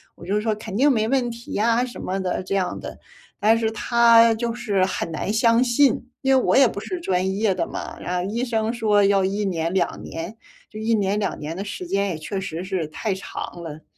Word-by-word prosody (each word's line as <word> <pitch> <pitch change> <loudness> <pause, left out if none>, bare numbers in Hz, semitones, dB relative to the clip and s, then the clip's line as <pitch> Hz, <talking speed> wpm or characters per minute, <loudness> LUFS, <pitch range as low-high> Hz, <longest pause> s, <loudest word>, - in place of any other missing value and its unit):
我 - - -12
就 205 +3 0
说： 220 -1 0
“肯 215 -2 -7
定 280 +6 +4
没 220 -4 +1
问 255 -1 +1
题 235 0 -9
呀” 230 +3 +2
什 245 - -9
么 190 +1 -2
的 185 -1 -2
这 195 - -2
样 185 -2 -1
的。 - - -8 0.4
但 220 +2 +4
是 225 -1 +1
他 230 0 +5
就 230 +1 -2
是 205 -6 +1
很 185 -3 -3
难 160 +5 -2
相 230 +1 +4
信， 250 0 +2
因 270 -1 +3
为 260 - +4
我 - - +2
也 270 - +7
不 205 - -5
是 360 - -5
专 190 - 0
业 210 -2 +2
的 170 -2 -2
嘛。 - - -7
然 180 - -3
后 185 +3 -2
医 235 +3 -1
生 225 -2 0
说 215 -4 +2
要 195 -1 +3
1 200 +2 -1
年、 170 -3 -1
2 185 -3 0
年， 170 +7 -7 0.3
就 215 - -9
1 225 +1 0
年、 205 0 0
2 200 - -2
年 155 +3 -5
的 195 - -4
时 190 -2 -6
间 200 +3 0
也 170 - -3
确 190 +5 -4
实 175 -2 -5
是 185 -5 -2
太 195 +7 -3
长 190 - -6 0.2
了。 155 -2 -8
205 Hz, 235 characters per minute, -23 LUFS, 185-230 Hz, 0.4 s, 也